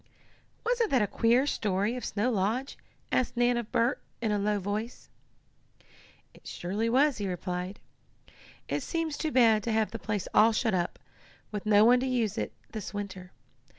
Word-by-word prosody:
"Wasn't 475 -2 +1
that 255 -5 +3
a - - +3
queer 235 +5 +2
story 205 -3 0
of 250 - -6
Snow 215 +5 0
Lodge?" 225 +6 -1 0.4
asked 250 -1 0
Nan 245 0 +3
of 235 -2 -4
Bert, 235 +4 +1 0.2
in 225 -2 -1
a 205 - +1
low 210 +1 +1
voice. 210 +5 -5 1.2
"It - - -16
surely 205 +6 -2
was," 270 +2 +3
he 200 - -2
replied. 180 +1 -4 0.9
"It - - -1
seems 330 -3 -2
too 315 +1 -2
bad 225 -5 +5
to 230 - -2
have 220 -1 +1
the - - -5
place 210 -4 -3
all 225 +2 +6
shut 220 -1 +1
up, 175 -2 -1 0.5
with 210 0 -5
no 210 0 +6
one 245 +2 +6
to 260 - -1
use 230 -5 0
it - - -3 0.2
this 210 -3 -6
winter. 190 -3 -6
220 Hz, 175 wpm, -29 LUFS, 205-245 Hz, 1.2 s, all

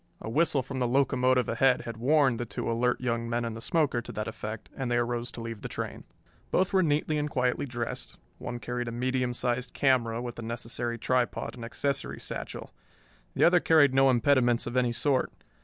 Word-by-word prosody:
A 110 - -6
whistle 150 -1 +2
from 135 +2 -5
the 125 - +1
locomotive 130 -1 +2
ahead 130 +3 +3
had 115 -2 -7
warned 130 0 +3
the 120 - -2
two 105 +2 -3
alert 125 +2 +1
young 115 -2 -1
men 120 0 -1
in 115 - -3
the 115 - -8
smoker 140 -3 +1
to - - -9
that 105 - -3
effect, 110 -1 -6
and 130 -2 -3
they 120 - +1
arose 120 0 -1
to 120 - -7
leave 115 -2 -6
the - - -5
train. - - -5 0.4
Both 185 +1 +1
were 190 - +5
neatly 150 -1 +1
and 150 0 -1
quietly 125 +1 0
dressed. 120 -2 -5 0.2
One 120 - -5
carried 120 0 -4
a - - -3
medium 125 +1 0
sized 125 0 -2
camera 120 -4 +2
with 120 0 -6
the - - -5
necessary 115 +1 -4
tripod 125 +1 0
and 120 - -9
accessory 135 +3 -2
satchel. - - -6 0.6
The - - +2
other 175 +1 +6
carried 155 -5 +5
no 135 0 +5
impediments 120 -1 +3
of 120 - -5
any 125 -1 +2
sort. 130 +3 +1
125 Hz, 205 wpm, -28 LUFS, 120-135 Hz, 0.6 s, other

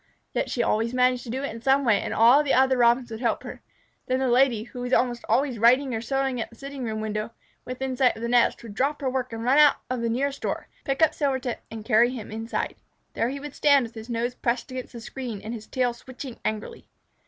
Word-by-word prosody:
Yet - - -1
she 240 - 0
always 230 +3 0
managed 250 0 +3
to - - -8
do 260 +4 -3
it 280 - -3
in 230 - -9
some 270 +2 +3
way, 215 -4 +3
and - - -4
all 240 +6 +6
the 290 -2 +1
other 265 0 +4
Robins 240 0 +3
would 220 - -5
help 235 -3 0
her. - - -8 0.5
Then 255 - +1
the 265 0 0
Lady, 240 -3 +3
who 245 +1 -9
was 245 +1 -3
almost 245 -1 +2
always 260 -4 +1
writing 255 +4 +4
or 225 - -2
sewing 270 0 -1
at - - -5
the 230 - -17
sitting 275 +1 -7
room 220 -1 -3
window, 215 0 -3 0.4
within 255 +1 -4
sight 250 -1 +3
of 225 - -8
the - - 0
nest, 240 0 +2
would 225 -3 -9
drop 275 +7 0
her 265 - 0
work 255 -1 -2
and 225 0 -5
run 260 +5 +4
out 295 -1 +7
the 235 -2 -1
nearest 275 +4 -1
door, - - -3 0.2
pick 275 +3 +1
up 315 - +4
Silvertip, 265 -4 -1
and 220 -1 -8
carry 230 +3 +4
him 245 -5 -7
inside. 225 +1 -3 0.4
There 230 - 0
he 280 +2 -5
would 290 0 -8
stand, 285 -3 +4
with 230 -1 -7
his 225 0 -9
nose 235 +1 -1
pressed 245 +2 -2
against 255 0 -6
the 235 - -8
screen 240 -3 -6
and 220 +3 -6
his 220 -2 -8
tail 250 -2 0
switching 255 +1 -9
angrily. 215 -1 -4
245 Hz, 245 wpm, -25 LUFS, 230-265 Hz, 0.5 s, out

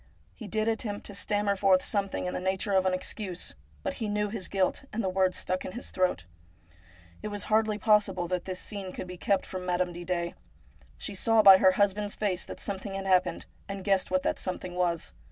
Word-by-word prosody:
He 220 - -9
did 215 +2 0
attempt 220 -2 -2
to 205 - -3
stammer 205 0 +1
forth 190 -1 +4
something 200 -3 -1
in 180 - -2
the - - -2
nature 190 +2 0
of 190 -1 +3
an 185 - +2
excuse, 185 -1 -5 0.3
but - - -1
he 220 - 0
knew 210 0 0
his 200 -3 -4
guilt, 190 +4 0
and 225 +1 -2
the 190 - +1
words 185 0 +1
stuck 185 0 -2
in 185 - -6
his 240 - -5
throat. 185 - 0 1.0
It - - -4
was 205 -1 -3
hardly 215 -1 +3
possible 210 -4 +2
that 180 0 -2
this 185 -1 -4
scene 195 -3 -5
could - - -5
be 180 0 -8
kept 195 +2 +1
from 185 -1 -6
Madame 180 0 0
Didet. 175 0 -2 0.6
She 205 - -5
saw 220 +3 +4
by 195 -2 +10
her 190 -1 +6
husband's 205 +1 +1
face 190 -4 -1
that - - -8
some 200 -2 -3
thing 195 0 -6
had 195 0 -4
happened, 185 -1 +2 0.2
and 195 -1 -5
guessed 195 -1 +2
what 185 0 +1
that - - 0
something 185 -1 -4
was. 175 -2 -1
190 Hz, 215 wpm, -29 LUFS, 185-205 Hz, 1.0 s, by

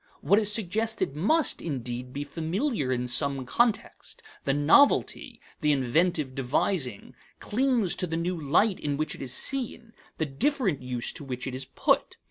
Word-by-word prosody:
What 200 +3 +4
is 210 -1 +2
suggested 220 -5 0
must, 285 - +2
indeed, 125 -4 -5
be 145 +2 -4
familiar 165 - -2
in 125 -1 -1
some 135 +1 +3
context; 230 - -1 0.2
the 135 - +2
novelty, 155 - +3 0.2
the 150 -3 +2
inventive 145 +2 +1
devising, 130 - -1 0.3
clings 240 -4 +1
to 180 - -2
the 165 0 -2
new 175 +2 -1
light 170 +7 +1
in 145 -1 -2
which 155 +1 -2
it - - -10
is 130 -2 -3
seen, 235 - -3 0.2
the 160 - 0
different 195 - 0
use 125 -2 -3
to - - -4
which 125 -2 -5
it 130 - -4
is 130 +1 -5
put. - - 0
160 Hz, 160 wpm, -27 LUFS, 135-210 Hz, 0.3 s, What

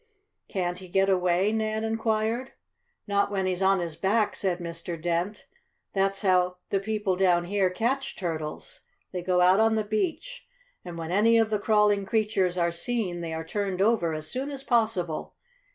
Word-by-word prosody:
"Can't 180 -2 -2
he 185 - -10
get 195 +2 +2
away?" 180 +1 +2
Nan 220 0 -1
inquired. 225 +2 -1 0.5
"Not 200 -1 +1
when 195 -2 -1
he's 185 0 -1
on 195 0 +4
his 170 -3 -4
back," 205 +5 +1
said 185 -3 -1
Mr. 170 -1 -6
Dent. 175 +5 -2 0.5
"That's 195 +1 0
how 180 -1 +3 0.2
the 195 - +2
people 205 -2 -1
down 180 -2 +3
here 190 +1 +1
catch 240 +8 -2
turtles. 160 -4 -5 0.3
They 180 - -3
go 180 0 +2
out 185 +3 +5
on 220 0 +4
the 215 - +1
beach, 340 - -3 0.4
and 175 -1 -8
when 165 0 -5
any 225 +4 +4
of 225 -1 +2
the 210 - +1
crawling 210 -2 +2
creatures 200 -4 +1
are 170 -1 +2
seen, 180 -1 -2
they 165 -1 -4
are 160 0 -4
turned 195 +1 -2
over 195 -6 +2
as 155 0 -5
soon 265 - -3
as 275 -2 -7
possible. 220 - 0
195 Hz, 175 wpm, -27 LUFS, 175-220 Hz, 0.5 s, out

